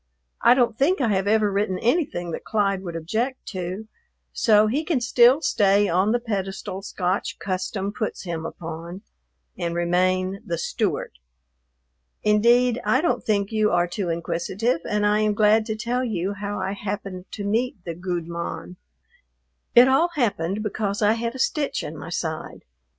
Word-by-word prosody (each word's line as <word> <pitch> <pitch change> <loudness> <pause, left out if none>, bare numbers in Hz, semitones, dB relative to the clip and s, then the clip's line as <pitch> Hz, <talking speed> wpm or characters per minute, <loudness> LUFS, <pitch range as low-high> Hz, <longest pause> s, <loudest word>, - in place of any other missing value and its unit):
I 240 +1 +6
don't 240 -3 +2
think 335 +8 +3
I 245 -5 +1
have 195 -1 +1
ever 210 -1 +3
written 195 -1 0
anything 235 - 0
that - - -5
Clyde 200 -3 0
would 175 -3 -6
object 225 +11 -2
to, 185 +3 -5 0.5
so 215 -2 +4
he 265 +9 0
can 315 -4 0
still 245 +4 +5
stay 205 -5 +3
on 185 +4 +2
the 240 - +3
pedestal 195 -4 -4
Scotch 190 -1 -2
custom 195 +1 -3
puts 215 -1 -4
him 170 -3 -4
upon 165 +3 -7 0.6
and 170 0 -2
remain 185 +2 +1
"the 170 -6 -3
Stewart." - - -2 1.1
Indeed, 235 +3 +4
I 260 - +2
don't 340 - 0
think 200 -1 0
you 215 -1 +2
are 175 0 +2
too 175 +1 -3
inquisitive, 170 +6 -1
and 210 0 +1
I 210 +1 +3
am 215 -1 +1
glad 215 +1 +4
to 220 - -2
tell 240 +3 -1
you 200 -5 -2
how 205 +1 -4
I 190 0 -2
happened 195 -2 -5
to 205 - -5
meet 230 +5 0
the 170 - -3
"gude 175 -1 -4
mon." 170 +1 -6 1.0
It 240 +1 +9
all 270 +6 +4
happened 205 - 0
because 210 0 -2
I 210 +1 +5
had 230 +2 -3
a - - -5
stitch 285 +2 0
in 155 - -6
my 150 +2 -8
side. 160 -2 -4
205 Hz, 165 wpm, -24 LUFS, 180-230 Hz, 1.1 s, It